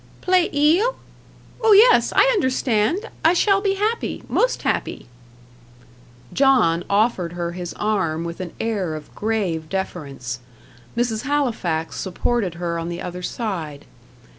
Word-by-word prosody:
"Plait 365 -1 +3
il? 325 +12 +3 0.7
oh 445 -2 +6
yes; 455 +5 +6
I - - +7
understand. 260 - 0
I 325 - +5
shall 395 +2 +3
be 395 -1 +1
happy 430 +4 -2
most - - +1
happy." - - -2 1.3
John 250 -12 +3
offered 200 -4 +1
her 170 -1 -3
his 175 0 -6
arm 170 -7 -1
with 170 +1 -6
an 180 -2 -6
air 200 -8 -2
of 155 -1 -10
grave 190 -8 -2
deference; 140 -10 -4 0.6
Mrs. 235 -2 0
Halifax 225 - -1
supported 190 0 -1
her 170 -1 -3
on 165 +1 -4
the 175 0 -5
other 180 0 -6
side. 175 - -4
210 Hz, 130 wpm, -22 LUFS, -, 1.3 s, I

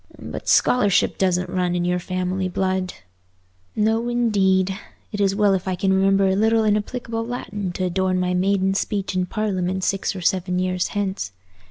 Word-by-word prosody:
But - - -8
scholarship 205 -6 +3
doesn't 185 -1 +1
run 180 -1 0
in 175 0 0
your 180 0 +1
family 185 +1 -2
blood." 185 0 -1 0.8
"No 225 +3 +1
indeed. 195 -6 +2 0.4
It's 200 -2 +1
well 205 -1 +3
if 190 0 -2
I 185 - 0
can 190 +2 +1
remember 195 0 +3
a 190 - +2
little 220 +2 +3
inapplicable 225 +2 -1
Latin 210 -5 -4
to 185 - -2
adorn 185 +1 0
my 180 0 0
maiden 190 +1 +1
speech 195 -1 -2
in 185 0 0
Parliament 190 -3 -2
six 195 +1 -1
or 185 - -6
seven 180 +1 0
years 185 0 0
hence. 190 - -2
190 Hz, 165 wpm, -22 LUFS, 185-205 Hz, 0.8 s, scholarship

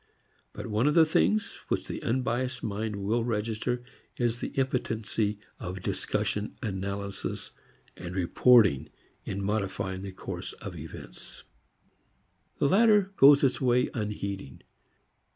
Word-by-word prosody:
But - - -7
one 110 +5 +1
of 150 - +2
the 165 -1 +7
things 210 +7 +1
which - - -1
the - - -5
unbiased 125 +1 -1
mind 105 0 -2
will 105 +4 0
register 115 +2 -1 0.3
is 120 -1 0
the - - -3
impotency 115 -5 0 0.2
of 90 +1 -6
discussion, 105 0 -1
analysis 100 -1 -4 0.4
and 90 +1 -7
reporting 95 - +4 0.4
in 100 0 -3
modifying 95 -2 -2
the 95 0 -6
course 95 - -6
of - - -8
events. - - -10 1.1
The - - +2
latter 205 +1 +5
goes 140 +1 +8
its 135 +1 +2
way 125 -1 +3
unheeding. 100 - -4
110 Hz, 120 wpm, -28 LUFS, 100-125 Hz, 1.1 s, goes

